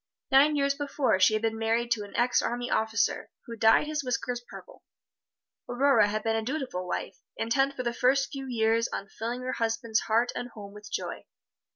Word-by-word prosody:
Nine 285 +3 +6
years 280 -1 +2
before 280 -7 0
she 190 +3 +5
had 215 - -2
been 225 0 -1
married 230 +1 0
to 220 -3 +1
an 205 - -11
ex 245 +1 +3
army 245 +1 -3
officer, 220 -1 0 0.2
who 230 - -7
dyed 225 +5 +4
his 300 -1 -3
whiskers 245 -1 -2
purple. - - -12 0.9
Aurora 245 -3 +4
had 215 +1 -2
been 225 0 +1
a 225 - 0
dutiful 250 -8 -4
wife, - - -4 0.2
intent 270 +5 +1
for 255 - -4
the 235 -1 -1
first 265 +3 +2
few 270 -2 -6
years 230 -1 +1
on 195 - -6
filling 235 +5 -5
her 255 - -2
husband's 230 0 0
heart 230 +2 +1
and 245 - -4
home 205 -3 -11
with 210 0 -12
joy. - - -5
235 Hz, 195 wpm, -28 LUFS, 220-265 Hz, 0.9 s, Nine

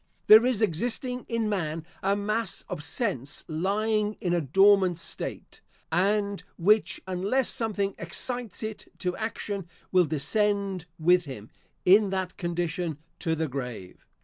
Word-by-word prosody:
There 220 +3 +9
is 235 -4 +1
existing 245 - -1
in 230 -2 0
man, 165 -6 -2 0.2
a 195 +1 +2
mass 205 -1 -1
of 150 - -5
sense 145 - -2
lying 210 +6 0
in 175 -2 0
a 175 - +2
dormant 190 +4 +5
state, 170 - -6 0.3
and 200 +3 +1
which, 210 +5 +3
unless 195 +8 0
something 205 -4 -1
excites 235 +6 -4
it 220 -1 -5
to 180 -1 -2
action, 200 -5 -4 0.2
will 185 -1 +5
descend 195 +4 0
with 175 +2 +4
him, 115 -6 -9 0.3
in 200 +2 +6
that 190 -1 -2
condition, 175 -2 -2 0.2
to 165 -1 0
the 160 0 -1
grave. 125 -9 -6
190 Hz, 135 wpm, -27 LUFS, 165-210 Hz, 0.3 s, There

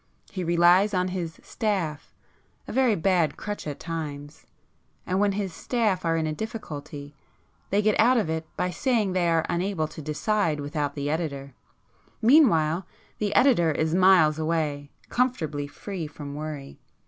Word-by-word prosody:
He 185 -2 -4
relies 175 +4 +4
on 180 0 +1
his 175 -3 -5
'staff'—a 185 -9 -5
very 255 -4 +3
bad 170 -4 +1
crutch 205 -6 -5
at 145 - -5
times,—and 155 +3 -7
when 205 -1 +2
his 195 -3 -3
'staff' 215 -3 0
are 165 0 +2
in 160 - 0
a 155 - -1
difficulty, 150 -8 -7 0.6
they 205 +2 +2
get 215 0 +2
out 245 +3 +5
of 220 - +1
it 160 0 -3
by 180 - 0
saying 215 0 0
they 175 -2 +1
are 165 -1 +2
unable 175 -2 -1
to 160 - -9
decide 155 +2 0
without 145 0 -3
the 145 -1 -3
editor. 140 -4 -3 0.7
Meanwhile 190 - +4 0.3
the 205 -1 -1
editor 205 - +4
is 155 +1 0
miles 180 -4 +5
away, 155 -3 -1 0.2
comfortably 155 - -1
free 175 +2 -6
from 145 -1 -8
worry. 150 -2 -7
165 Hz, 150 wpm, -26 LUFS, 155-200 Hz, 0.7 s, out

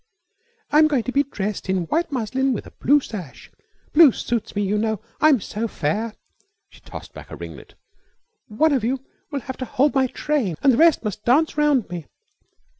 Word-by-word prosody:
"I'm 305 +1 +6
going 275 -6 0
to 255 - -3
be 280 - +3
dressed 210 -8 -4
in 190 -2 +1
white 330 - -1
muslin 265 +1 0
with 220 - -5
a - - -12
blue 290 +4 +3
sash. 185 - -9 0.4
Blue 310 -3 +8
suits 235 -1 -3
me, 205 - 0
you 200 +1 0
know. 220 -1 -1 0.2
I'm 300 -5 +5
so 215 +3 -4
fair." 210 +6 -2 0.5
She - - -19
tossed - - -10
back - - -11
a - - -7
ringlet. - - -10 0.7
"One 295 +9 +2
of 260 -5 +1
you 255 +3 -1 0.3
will 280 -3 -3
have 260 0 -7
to 255 - -4
hold 270 +4 +1
my 265 -2 +3
train 255 - -1
and 270 - +6
the - - +1
rest 330 -2 +5
must 210 -1 -4
dance 295 +7 +3
round 295 -6 +2
me. 170 -4 -6
255 Hz, 190 wpm, -22 LUFS, 210-290 Hz, 0.7 s, Blue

